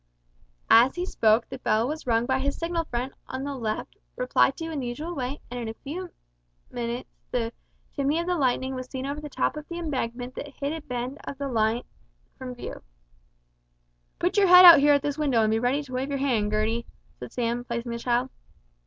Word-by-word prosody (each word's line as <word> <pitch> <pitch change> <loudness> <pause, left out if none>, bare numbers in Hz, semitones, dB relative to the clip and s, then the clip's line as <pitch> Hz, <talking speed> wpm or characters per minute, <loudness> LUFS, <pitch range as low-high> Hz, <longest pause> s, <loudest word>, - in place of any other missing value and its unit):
As 240 +4 +6
he 355 0 -2
spoke 225 - +2
the 265 - -8
bell 225 -1 +1
was 305 -1 -5
rung 230 0 +2
by 260 +1 +1
his 280 +1 -1
signal 335 0 -2
friend 250 0 -3
on 260 +1 -4
the 285 0 -3
left 225 -5 -4 0.2
replied 250 +1 +2
to 325 0 -5
in 305 - -3
the 250 - -3
usual 300 +8 -4
way, 265 -2 -4
and 245 - -4
in 235 - -4
a 220 - -6
few 350 +9 -6 0.6
minutes 240 +1 -4 0.2
the 235 -2 -2 0.4
chimney 285 +2 +1
of 340 - -1
the 360 - 0
Lightning 260 -3 0
was 255 -1 -6
seen 260 -1 -5
over 285 +2 -4
the 300 - -7
top - - 0
of 300 -1 -7
the 340 - -6
embankment 255 -6 -3
that 290 - -6
hid 280 +2 -2
a 325 - -5
bend 250 +1 -5
of 280 - -6
the 280 - -3
up 275 - -3
line 225 +1 +1 0.6
from 255 -1 -6
view. 245 - -7 1.4
"Put 355 +4 0
your 400 -1 +5
head 360 0 +10
out 340 -4 +12
here 290 +1 +5
at 285 - 0
this 290 +1 -2
window, 265 -7 +3
and 215 - +2
be 220 - +2
ready 255 +5 +1
to 260 -2 -11
wave 260 +2 -2
your 280 - -1
hand, 235 -7 +1
Gertie," 220 +2 0 0.3
said - - -8
Sam, 240 0 -1
placing 235 0 -4
the 235 - -4
child. 245 +2 0
260 Hz, 220 wpm, -26 LUFS, 240-290 Hz, 1.4 s, out